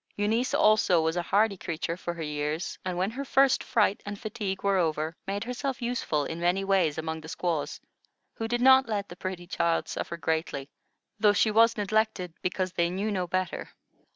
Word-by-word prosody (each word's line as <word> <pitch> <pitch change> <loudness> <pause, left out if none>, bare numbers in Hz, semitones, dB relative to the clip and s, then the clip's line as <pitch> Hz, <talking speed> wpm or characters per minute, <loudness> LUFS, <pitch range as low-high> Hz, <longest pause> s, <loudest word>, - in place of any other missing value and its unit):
Eunice 220 +5 +1
also 210 -5 +4
was 160 +1 0
a 175 - +1
hardy 200 +3 +2
creature 165 -1 -3
for 175 -1 -5
her 165 - -5
years, 150 +3 -3
and 185 -1 -3
when 190 +4 0
her 270 +4 -4
first 270 -1 +3
fright 210 -5 +2
and 205 0 -6
fatigue 210 -3 -4
were 200 -1 +3
over, 160 -1 -1
made 200 +2 -2
herself 250 +3 -3
useful 235 - -1
in 160 +3 -5
many 175 +3 +1
ways 190 -6 +2
among 160 0 -3
the 160 - -10
squaws, 170 -4 -2 0.5
who 225 - -4
did 240 +1 -1
not 265 -1 +6
let 200 -2 -2
the 175 - -9
pretty 185 -1 -5
child 170 -2 0
suffer 170 - -4
greatly; 160 -4 -2 0.5
though 205 -1 +5
she 215 +1 +3
was 230 +2 +5
neglected, 210 -4 0
because 185 0 -2
they 170 -1 +1
knew 195 +4 -2
no 185 -3 -1
better. 185 0 -2
190 Hz, 190 wpm, -28 LUFS, 170-215 Hz, 0.5 s, not